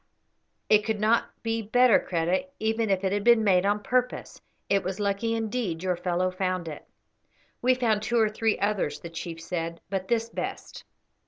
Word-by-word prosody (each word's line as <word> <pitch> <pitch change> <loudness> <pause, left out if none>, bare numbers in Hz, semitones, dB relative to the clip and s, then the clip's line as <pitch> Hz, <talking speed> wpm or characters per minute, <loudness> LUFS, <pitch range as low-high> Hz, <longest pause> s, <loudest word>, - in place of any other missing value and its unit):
"It 210 0 +5
could 220 -1 -2
not 220 +2 +3 0.2
be 225 0 -1
better, 245 +2 +4
Kreta, 175 +8 -1
even 220 0 0
if 195 -1 +1
it 190 - +1
had 205 0 0
been 235 -1 +5
made 190 -2 +3
on 205 +1 0
purpose. 250 +3 -1 0.3
It 200 0 +2
was 190 +2 -4
lucky 205 +3 0
indeed 220 -6 -2
your 185 -1 +1
fellow 180 +1 -1
found 185 -2 -2
it." 150 - -8 0.7
"We 255 +1 +4
found 225 -4 +1
two 235 +2 0
or 220 -1 +4
three 220 +1 0
others," 195 -8 -1
the 170 +3 -9
chief 165 0 -6
said, 165 0 -4
"but 190 -1 -2
this 230 -1 +1
best." - - -6
205 Hz, 180 wpm, -27 LUFS, 185-225 Hz, 0.7 s, It